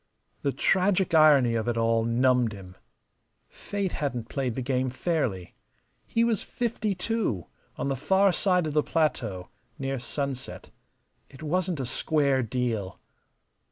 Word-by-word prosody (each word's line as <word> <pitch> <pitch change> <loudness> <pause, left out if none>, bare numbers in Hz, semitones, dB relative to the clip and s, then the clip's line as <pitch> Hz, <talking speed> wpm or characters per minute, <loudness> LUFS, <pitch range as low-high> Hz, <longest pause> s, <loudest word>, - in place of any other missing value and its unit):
The 140 - 0
tragic 185 +3 +2
irony 145 -6 +6
of 115 0 -1
it 120 -1 0
all 115 0 +2
numbed 120 0 +2
him. 95 -2 -11 0.7
Fate 200 -3 -4
hadn't 125 -6 -3
played 130 -4 -2
the 130 - -3
game 130 0 0
fairly. 125 - -2 0.5
He 230 - +1
was 230 -4 +1
fifty 220 -4 -2
two, 185 - -1 0.3
on 140 - -2
the 135 - 0
far 190 +8 +3
side 180 -3 +2
of 155 - -3
the 150 - +4
plateau, 115 - -1 0.3
near 135 -1 -3
sunset. 135 +1 -5 0.6
It 140 +3 -13
wasn't 175 +1 -1
a 130 - -2
square 140 +1 +1
deal. 115 -5 -2
135 Hz, 140 wpm, -27 LUFS, 120-180 Hz, 0.7 s, irony